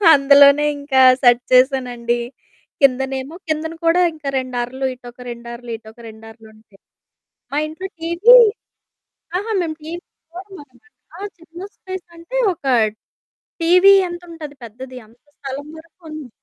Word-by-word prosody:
అందులోనే 280 +1 +6
ఇంకా 280 -2 +1 0.2
సెట్ 245 -1 +5
చేసానండి. 250 -2 +2 0.6
కిందనేమో 265 +2 +1
కిందన 315 +1 -3
కూడా 335 +2 +3
ఇంకా 300 -3 -6
2 255 -1 -4
అరలు, 260 +2 -4
ఇటొక 245 0 -14
2 235 0 -9
అరలు, 235 0 -9
ఇటొక 220 0 -16
2 220 0 -13
అరలుంటాయి. 220 -2 -20 0.7
మా 285 - 0
ఇంట్లో 325 +5 -7
టీవీ 340 +9 +4 1.0
అహా! 425 +4 -4
మేము 320 -2 -3
టీవి 330 +3 -6 0.3
చూడమనమాట. 345 -8 -12 0.4
ఆ - - -10 0.2
చిన్న 335 0 -15 0.2
స్పేస్ 375 -1 -8
అంటే 335 +10 -6 0.2
ఒక 315 - -19 1.0
టీవీ 365 +4 +6
ఎంతుంటది 335 -4 -9
పెద్దది, 255 +3 -10
అంత 230 +3 -24 0.2
స్థలం 275 +1 -7
వరకు 330 +2 -18
ఉంది. 305 -4 -8
280 Hz, 130 wpm, -19 LUFS, 245-330 Hz, 1.0 s, అందులోనే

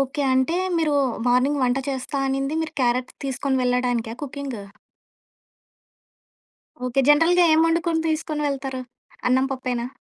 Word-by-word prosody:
Okay. 275 +2 -1
అంటే 260 +7 +1 0.2
మీరు 310 -3 +1 0.3
morning 260 +4 +2
వంట 250 +1 +2
చేస్తా 270 +2 -4
అనింది 275 +3 -1
మీరు 315 - -6
క్యారెట్ 245 +1 0
తీసుకొని 265 0 -1
వెళ్ళడానికా 245 -2 0
కుకింగ్? 275 -5 -6 2.3
ఓకే. 250 +2 +1
జనరల్‌గా 330 +4 +5
ఏం 315 - +5
వండుకొని 330 0 +1
తీసుకొని 310 -1 -2
వెళ్తారు? 270 -2 -4 0.5
అన్నం 260 +1 +3
పప్పేనా? 250 -2 -3
270 Hz, 120 wpm, -23 LUFS, 250-300 Hz, 2.3 s, జనరల్‌గా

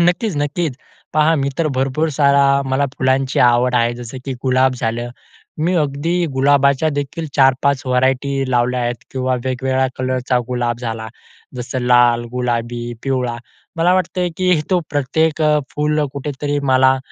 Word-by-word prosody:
नक्कीच, 175 +1 +1
नक्कीच. 145 0 -2 0.4
पहा 155 +1 +4
मी 140 -1 0
तर 165 - +1
भरपूर 135 +4 0
सारा 140 -1 +4 0.3
मला 135 +2 +2
फुलांची 130 +1 +1
आवड 125 +1 +3
आहे 120 0 +2
जसं 120 +1 -8
की 135 - -3
गुलाब 130 0 +2
झालं. 120 +1 -2 0.5
मी 170 +4 +1
अगदी 160 +4 0
गुलाबाच्या 140 +2 +3
देखील 145 +3 -4
4-5 135 0 +3
व्हरायटी 130 +1 0
लावल्या 125 0 +1
आहेत 120 0 -1 0.2
किंवा 130 -1 -1
वेगवेगळ्या 130 +1 0
कलरचा 130 -1 0
गुलाब 120 -2 -1
झाला. 115 -2 -4 0.5
जसं 125 +1 -4
लाल, 120 -1 +4
गुलाबी, 120 -1 -2
पिवळा 125 -3 -1 0.4
मला 170 +2 +3
वाटतं, 180 0 0
की 180 -4 +2
तो 185 - +3
प्रत्येक 155 +3 0 0.3
फुल 150 +1 0
कुठेतरी 145 +1 -3
मला 130 0 +4
130 Hz, 140 wpm, -18 LUFS, 125-145 Hz, 0.5 s, पहा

